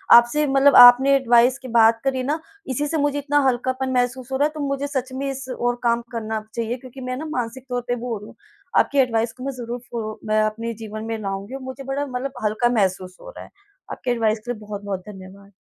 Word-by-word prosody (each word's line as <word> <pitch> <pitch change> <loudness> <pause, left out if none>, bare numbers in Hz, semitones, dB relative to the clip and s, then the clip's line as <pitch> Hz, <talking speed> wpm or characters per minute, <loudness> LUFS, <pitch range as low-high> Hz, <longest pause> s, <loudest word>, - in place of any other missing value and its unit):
आपसे 240 +6 +5
मतलब 275 +1 +4
आपने 250 +3 +9
एडवाइस 245 -1 +4
की 260 - -10
बात 230 -1 +4
करी 265 -1 0
ना 295 +5 -1 0.3
इसी 290 +3 -1
से 320 - -1
मुझे 290 -1 0
इतना 290 +1 +1
हल्कापन 260 +1 -1
महसूस 250 +1 -1
हो 265 - 0
रहा 285 - +3
है। - - -9
तो 310 - -8
मुझे 275 +1 -2
सच 265 -2 -3
में 275 +1 -3
इस 270 -1 -6
ओर 245 0 -1
काम 235 0 +2
करना 220 -2 -3
चाहिए 235 +1 -2
क्योंकि 260 +1 -12
मैं 255 - -2
ना 310 - -5
मानसिक 250 -1 -4
तौर 245 0 -1
पे 245 - 0
वो 245 +1 -6
हो - - -2
रही 210 +1 -11
हूँ। - - -14 0.4
आपकी 285 - +1
एडवाइस 230 -3 +1
को 255 - -11
मैं 275 - -2
ज़रूर 240 -1 -6
फ़ो 215 -2 -5
मैं 215 0 +2
अपने 225 +2 -2
जीवन 215 0 -6
में 225 0 -3
लाऊँगी 195 +4 -5
और 270 - -7
मुझे 260 +1 -7
बड़ा 270 +2 -2
मतलब 260 0 -4
हल्का 220 +3 +1
महसूस 185 -1 -1
हो - - -10
रहा - - -10
है। - - -17 0.4
आपके 250 - -3
एडवाइस 225 -2 +1
के 240 +3 -6
लिए 235 - -6
बहुत-बहुत 205 -2 -5
धन्यवाद। 195 0 -12
245 Hz, 240 wpm, -22 LUFS, 225-270 Hz, 0.4 s, आपने